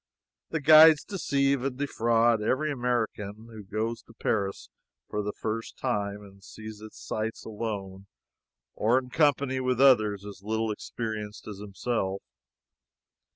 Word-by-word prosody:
The 160 - -2
guides 155 +1 +8
deceive 140 - 0
and 135 -2 -2
defraud 115 -4 +2
every 140 +8 0
American 115 -4 -2
who 110 -1 -9
goes 110 +4 -3
to 115 - -19
Paris 100 -3 -2 0.4
for 105 - -2
the 105 0 -3
first 115 +2 -5
time 105 -5 -2
and 100 -1 -16
sees 110 0 -10
its 110 0 -11
sights 110 +1 -4
alone 100 -3 -5 0.7
or 115 +4 +2
in 125 -1 -3
company 140 -3 +2
with 130 -1 0
others 110 -7 +4
as 100 -2 -9
little 110 +1 -1
experienced 105 -1 -5
as 105 -2 -7
himself. 100 -1 -3
110 Hz, 135 wpm, -28 LUFS, 105-130 Hz, 0.7 s, guides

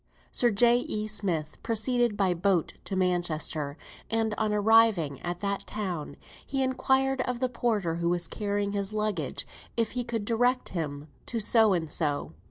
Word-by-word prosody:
Sir 240 - +3
J. 235 +3 +4
E. 215 -3 -3
Smith 180 -8 -2
proceeded 235 0 +1
by 190 -3 +2
coach 180 -1 +1
to 195 - -3
Manchester, 165 -5 -1 0.3
and 225 0 0
on 215 -1 0
arriving 210 - +4
at 175 0 -4
that 200 -1 -2
town, 180 -9 -4 0.3
he 270 0 -1
inquired 265 0 +2
of 250 -1 -2
the 255 - +1
porter 215 -9 -1
who 170 0 0
was 175 -1 0
carrying 205 0 -2
his 200 0 -2
luggage 215 -1 -1 0.3
if 230 -2 +1
he 250 -1 -2
could 225 -3 -3
direct 245 +3 +1
him 150 -4 -4 0.2
to 235 - -2
So 220 -1 +5
and 165 -3 -1
So. 145 - -1
205 Hz, 165 wpm, -28 LUFS, 175-230 Hz, 0.3 s, So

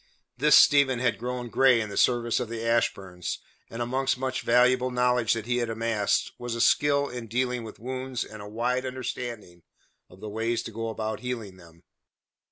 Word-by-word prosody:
This 150 +4 +5
Stephen 140 -3 +6
had 120 -1 0
grown 125 0 -4
grey 130 0 +4
in 110 -2 -3
the - - -6
service 120 -1 +2
of 125 -3 -4
the 115 0 -5
Ashburns, 95 -6 -1 0.3
and 115 +1 -4
amongst 130 +2 0
much 130 0 -2
valuable 125 +1 +3
knowledge 125 -2 +2
that 115 -2 -4
he 120 +1 0
had 120 -2 -1
amassed, 115 -2 0
was 120 -1 -4
a - - -4
skill 140 +3 +3
in 120 -3 -7
dealing 125 +1 -1
with 110 - -9
wounds 130 +1 -4
and 110 -1 -10
a 100 - -9
wide 120 +4 -1
understanding 120 -8 -6 0.5
of 90 - -16
the 110 - -7
ways 115 +2 -2
to - - -7
go 115 +1 -4
about 110 -1 -4
healing 115 -7 -5
them. 85 -2 -18
120 Hz, 185 wpm, -27 LUFS, 110-125 Hz, 0.5 s, Stephen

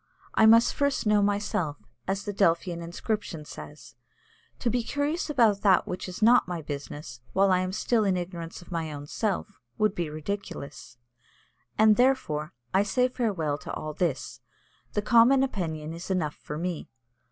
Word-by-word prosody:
I 220 - +5
must 230 +1 +6
first 280 -3 0
know 210 -1 +4
myself, 200 -7 0 0.3
as 195 +1 -1
the 205 - -4
Delphian 170 -2 +1
inscription 170 -1 -4
says; 75 - -10 0.6
to - - -3
be 245 +1 +1
curious 290 +7 -2
about 225 -8 +3
that 195 -3 +4
which 180 +1 -4
is 185 +4 -5
not 240 -1 +6
my 175 -2 -3
business, 140 -3 -7
while 195 0 +4
I 185 - +4
am 185 0 -1
still 220 +3 +1
in 190 -3 +2
ignorance 175 -1 -6
of 175 - -17
my 165 -2 -2
own 145 -1 -7
self, 205 +4 -3 0.2
would 215 -2 +2
be 170 -5 -2
ridiculous. 155 -6 -6 0.8
And, 215 -1 +6
therefore, 245 - +1 0.2
I 190 - +5
say 250 +5 +2
farewell 185 - -1
to - - -7
all 155 0 -4
this; 165 -3 -2 0.5
the 210 - 0
common 240 +4 +6
opinion 160 - -3
is 170 +3 -8
enough 165 -6 0
for 150 - -7
me. 175 0 -4
190 Hz, 165 wpm, -27 LUFS, 160-220 Hz, 0.8 s, must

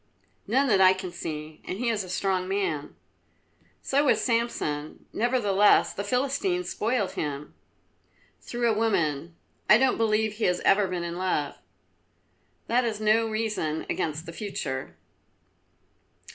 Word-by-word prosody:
"None 265 +6 +2
that 200 -6 +4
I 185 0 +7
can 185 -1 -6
see, 155 -2 -6
and 185 - -5
he 240 +2 0
is 215 -3 0
a 185 - -10
strong 185 0 0
man." 185 -7 -2 0.9
"So 285 +2 +2
was 270 - +4
Samson, 230 - -2
nevertheless 210 -4 +3
the 200 - -4
Philistines 280 - 0
spoiled 220 -3 0
him." 145 -1 -4 0.9
"Through 240 0 -2
a 225 - +3
woman. 170 -8 0 0.3
I 210 - +9
don't 260 +1 +2
believe 220 -1 +1
he 225 - 0
has 180 0 +2
ever 195 0 +4
been 180 -2 -3
in 170 0 -4
love." 180 -6 0 1.1
"That 245 +2 +2
is 220 -3 -2
no 220 +1 +3
reason 215 -8 -2
against 155 +1 -2
the 165 - -8
future." 130 - -5
200 Hz, 140 wpm, -27 LUFS, 170-230 Hz, 1.1 s, I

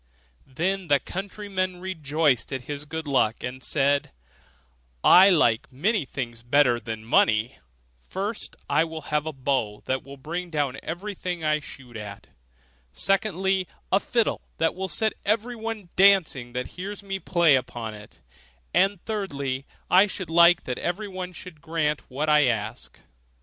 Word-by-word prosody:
Then 185 +7 -2
the 145 -2 +4
countryman 190 -1 -4
rejoiced 155 -8 0
at 130 -2 -3
his 145 +2 -6
good 160 +1 -5
luck, 125 -5 +1
and 130 +1 -5
said, 140 - +1 0.9
'I 190 +2 +8
like 120 - +3
many 180 - 0
things 120 -4 -5
better 120 0 +3
than 110 -2 -6
money: 110 +2 +2 0.5
first, 205 +4 -4
I - - +3
will 160 -1 -6
have 150 +1 +1
a - - -1
bow 130 -7 -1
that 130 0 -1
will 140 0 -11
bring 170 +6 -5
down 145 -4 -1
everything 180 -1 -5
I 155 0 +2
shoot 130 -4 -12
at; 105 -2 -8 0.7
secondly, 190 - 0 0.2
a 195 - +5
fiddle 230 +2 0 0.2
that 165 - +2
will 190 +1 -3
set 220 -1 +1
everyone 225 -2 -2
dancing 175 -11 +4
that 125 0 -3
hears 200 +1 -6
me 195 -1 -4
play 170 -6 +4
upon 120 -3 -3
it; 105 - -13 0.5
and 195 0 +3
thirdly, 140 -11 -3 0.2
I 190 +3 +6
should 185 -3 -6
like 170 +1 +6
that 125 - -4
everyone 185 -1 -3
should 175 -3 -11
grant 160 -2 -1
what 140 +4 -2
I 150 -2 +5
ask. 110 -4 -3
160 Hz, 145 wpm, -25 LUFS, 130-190 Hz, 0.9 s, I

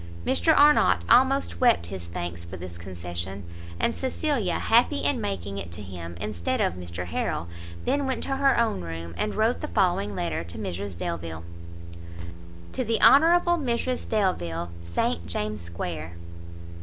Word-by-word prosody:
Mr 85 -1 +3
Arnott 295 +1 +5
almost 265 +2 +4
wept 240 - +4
his 90 -3 -6
thanks 85 0 -5
for 85 +2 -8
this 85 -1 -8
concession, 90 +2 -5 0.4
and 235 - +1
Cecilia, 260 - -1
happy 245 +6 +3
in 255 -5 +1
making 100 +1 -3
it 85 -3 -7
to 90 - -5
him 85 -3 -8
instead 85 -3 -2
of - - +2
Mr 90 0 -5
Harrel, 80 -1 -2 0.4
then 285 -1 +1
went 260 - -1
to 270 - -1
her 275 0 +4
own 225 - +1
room, 85 0 -6
and 90 - -2
wrote 220 +3 +1
the - - -3
following 140 - +1
letter 85 -2 -2
to 85 +4 -9
Mrs 100 -2 -4
Delvile. 85 -2 -4 1.3
To 255 - -1
the 225 -1 0
Hon. 275 - +8 0.4
Mrs 250 0 -1
Delvile, 85 - 0
St 85 0 -1
James's 105 +2 -3
square. 85 -1 -5
90 Hz, 155 wpm, -26 LUFS, -, 1.3 s, Hon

